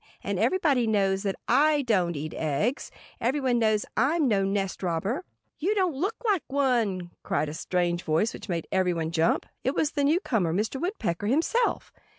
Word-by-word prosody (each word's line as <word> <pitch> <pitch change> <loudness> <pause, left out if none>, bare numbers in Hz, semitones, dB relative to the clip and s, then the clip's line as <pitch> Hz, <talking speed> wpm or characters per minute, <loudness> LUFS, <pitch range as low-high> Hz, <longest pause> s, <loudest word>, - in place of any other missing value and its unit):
And - - -2
everybody 290 -10 +2
knows 195 -3 +2
that 195 -2 -1
I 300 -1 +4
don't 185 -8 +1
eat 155 +2 -5
eggs. 160 - -1 0.3
Everybody 260 +1 +1
knows 215 -2 +2
I'm 290 +6 +2
no 200 -4 +2
nest 195 0 -1
robber." 190 - -1 0.4
"You 390 +7 +1
don't 370 -5 +1
look 380 +11 -2
like 405 -6 +2
one!" 235 -10 0
cried 145 +1 -1
a - - -6
strange 175 +1 -1
voice 165 +8 +1
which - - -9
made 170 -2 -2
everybody 175 -4 0
jump. 165 0 +1 0.2
It 265 - 0
was 300 - +1
the 285 - -1
newcomer, 240 - +1
Mr. 220 +7 -1
Woodpecker, 220 - -2
himself! 330 - +1
220 Hz, 165 wpm, -27 LUFS, 180-285 Hz, 0.4 s, I